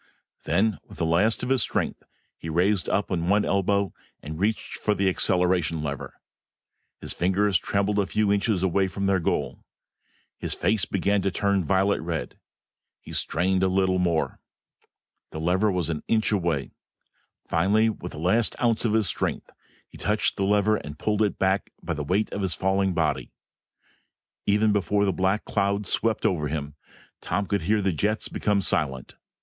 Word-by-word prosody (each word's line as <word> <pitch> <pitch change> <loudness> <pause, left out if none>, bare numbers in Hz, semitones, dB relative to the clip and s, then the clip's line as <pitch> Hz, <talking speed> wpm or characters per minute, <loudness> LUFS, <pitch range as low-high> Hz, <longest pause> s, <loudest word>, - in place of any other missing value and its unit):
Then, 100 +5 +1
with - - -15
the 85 - 0
last 90 +10 +2
of 125 - -2
his 135 -2 +3
strength, - - -1 0.3
he 80 - -8
raised 90 +4 +1
up 100 0 0
on 85 -1 -1
one 105 +1 +3
elbow 100 0 +1 0.3
and 75 +2 -6
reached 110 +3 -1
for 105 - +1
the 100 -1 +1
acceleration 90 -4 +1
lever. 70 -2 -5 0.9
His - - -3
fingers 95 +1 +2
trembled 100 +2 0
a 100 - +1
few 105 -1 +1
inches 100 -2 0
away 95 +1 +2
from 100 +1 -4
their 95 -1 +2
goal. 85 - -2 0.8
His - - -2
face 110 -2 +1
began 100 +1 0
to 95 - +1
turn 100 0 +1
violent 95 +5 +1
red. 85 -1 -4 0.6
He - - -11
strained 95 +3 +1
a 95 - +3
little 95 0 +1
more. 85 -3 0 0.9
The 80 - -7
lever 95 +6 +2
was 90 -3 -1
an 75 - -3
inch 110 -1 +1
away. 85 -9 -1 0.7
Finally, 100 +7 +2
with 90 -4 -8
the - - -9
very 80 - -5
last 115 - +2
ounce 115 -2 +1
of 110 - +1
his 110 -1 +3
strength, 90 - -2 0.4
he - - -15
touched 105 0 +1
the 95 - 0
lever 105 +1 +3
and 75 -4 -8
pulled 105 +5 0
it 105 -2 +1
back 95 0 +1
by - - -2
the 75 -1 -4
weight 95 +9 0
of 100 - -3
his 95 -3 +1
falling 95 -1 +1
body. 80 -3 -1 1.2
Even 105 +1 +3
before 100 0 +1
the 95 - +1
black 95 +4 0
cloud 100 0 0
swept 110 +3 0
over 75 -5 +1
him, 75 -1 -4 0.5
Tom 100 - -1
could 100 -1 -1
hear 105 +5 +1
the 95 -2 +1
jets 105 +7 -1
become 100 -2 0
silent. 65 -7 -1
95 Hz, 175 wpm, -25 LUFS, 85-105 Hz, 1.2 s, his